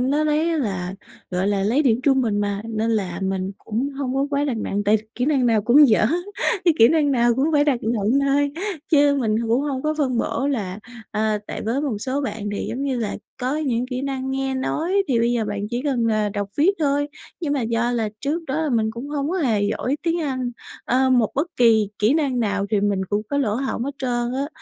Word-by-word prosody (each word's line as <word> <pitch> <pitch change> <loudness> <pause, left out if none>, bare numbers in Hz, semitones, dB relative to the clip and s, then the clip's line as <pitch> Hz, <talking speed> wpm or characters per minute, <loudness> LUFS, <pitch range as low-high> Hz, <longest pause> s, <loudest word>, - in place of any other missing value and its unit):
nó 285 +4 +1
lấy 305 +2 +1
á 330 - 0
là, 190 -8 -2 0.4
gọi 185 +2 0
là, 200 -1 +1
lấy 240 +9 +2
điểm 245 -4 +2
trung 270 -1 +3
bình 215 -4 0
mà, 205 0 -2
nên 225 0 -1
là 190 -5 -1
mình 190 0 -2
cũng 235 +6 -2
hông 270 -2 -3
có 275 +1 +1
quá 285 0 +1
đặt 265 -6 -1
nặng, 205 -1 -2
tại 210 +2 +4 0.2
kỹ 250 - -1
năng 275 -4 +2
nào 220 -3 +3
cũng 275 +6 +6
dở, 215 -1 +4 0.6
cái 340 -4 +4
kỹ 230 - +8
năng 300 -1 +2
nào 240 -1 +3
cũng 265 +4 +1
phải 290 -1 +4
đặt 275 -5 +1
nựng 225 +3 +1
thôi. 280 +1 +2 0.4
Chứ 290 -2 +5
mình 215 -3 +1
h 230 - -1
cũng 235 +3 +3
hông 275 -3 -2
có 305 0 0
phân 255 -5 +1
bổ 270 - -1
là 200 -8 -2 0.3
ờ, 215 0 0
tại - - -5
với 235 +6 -1
một 260 -9 -2
số 265 +5 -2
bạn 215 -7 -4
thì, - - -3
giống 255 +4 -3
như 270 -3 -1
là, 215 -3 -2 0.3
có 260 +4 0
những 250 -5 -1
kỹ 255 0 -4
năng 265 -1 -3
nghe 270 0 -1
nói 335 +9 0
thì 245 -4 +2
bây 235 +1 +2
giờ 235 -2 0
bạn 205 -1 -3
chỉ 240 +1 -2
cần, 255 -6 0
à, 215 -1 +1
đọc 200 0 -3
viết 310 +6 +5
thôi. 290 -1 +1 0.3
Nhưng 310 -4 -1
mà 285 - 0
do 230 +1 0
là 225 -3 0
trước 305 +5 -2
đó 300 +4 -1
là 310 - 0
mình 220 -3 +1
cũng 235 +5 -7
hông 290 +1 -2
có 375 - -1
hề 225 - +1
giỏi 250 +6 -1
tiếng 335 0 0
Anh, 255 -4 -2 0.3
ơ, 260 +1 +2
một 240 -4 +3
bất 290 +5 +1
kỳ 225 -4 +4
kỹ 215 +6 +3
năng 275 -6 +1
nào 200 -2 0
thì 210 -2 +2
mình 200 -2 0
cũng 205 +2 -1
có 285 - 0
lỗ 220 -7 +1
hổng 250 -1 -2
hết 280 +1 -4
trơn 240 -2 -1
á 275 +2 -2
250 Hz, 245 wpm, -22 LUFS, 215-280 Hz, 0.6 s, kỹ